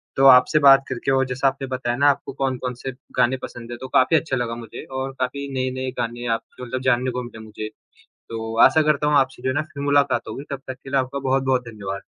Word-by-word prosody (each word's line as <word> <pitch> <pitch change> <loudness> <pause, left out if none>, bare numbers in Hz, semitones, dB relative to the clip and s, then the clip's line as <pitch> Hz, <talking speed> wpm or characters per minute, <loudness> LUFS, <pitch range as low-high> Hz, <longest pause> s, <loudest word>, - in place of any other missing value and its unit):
तो 135 - +3
आपसे 135 +4 +7
बात 135 -1 +7
करके 130 +1 -2
और 135 0 +3
जैसा 130 +2 0
आपने 135 0 -2
बताया 125 -2 -2
ना 145 +2 +5
आपको 140 - -1
कौन-कौन 130 -2 -2
से 130 +2 -6 0.3
गाने 130 +2 +3
पसंद 120 0 -10
है 120 - -5
तो 130 - -5
काफ़ी 145 +5 +5
अच्छा 150 -4 -1
लगा 120 -1 -2
मुझे 115 -2 -9
और 130 0 -4
काफ़ी 140 +2 -2
नए-नए 130 0 -2
गाने 120 +1 -3
आप 115 - -2 0.2
जो 125 - -7
मतलब 130 +2 -4
जानने 125 0 +1
को 125 0 -4
मिले 120 -2 -10
मुझे, 110 0 -6 0.6
तो 115 0 -5
आशा 155 +4 +5
करता 150 -1 +1
हूँ 150 - +3
आपसे 130 -2 0
जो 130 - 0
है 130 - -1
ना 150 - +2
फिर 140 - -5
मुलाकात 140 -4 +2
होगी 120 +6 -6
तब 135 - -4
तक 130 - -3
के 135 - -9
लिए 135 0 +2
आपका 130 +2 -3
बहुत-बहुत 130 -1 +1
धन्यवाद। 100 -3 -6
130 Hz, 240 wpm, -22 LUFS, 120-135 Hz, 0.6 s, आपसे